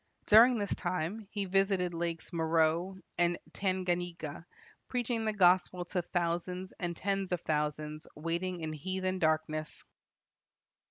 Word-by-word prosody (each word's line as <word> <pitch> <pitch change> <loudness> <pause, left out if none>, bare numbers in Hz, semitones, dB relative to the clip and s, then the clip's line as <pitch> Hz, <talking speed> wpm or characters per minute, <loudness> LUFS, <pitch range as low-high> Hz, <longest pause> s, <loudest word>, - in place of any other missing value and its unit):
During 235 +3 +7
this 205 -2 -1
time 185 +4 -3
he 205 -2 -2
visited 195 -2 +2
lakes 170 +1 -3
Meroe 165 +3 +2 0.2
and 175 0 +3 0.2
Tanganyika, 175 -4 -2 0.4
preaching 240 -2 -1
the 215 - +2
gospel 180 -2 +3
to 180 0 -1
thousands 175 +2 -2
and 175 -2 -2
tens 195 -1 -1
of 180 -2 0
thousands 150 0 -2
waiting 170 +3 -2
in 155 -1 -3
heathen 185 +4 -2
darkness. 155 -1 0
175 Hz, 120 wpm, -32 LUFS, 165-190 Hz, 0.4 s, During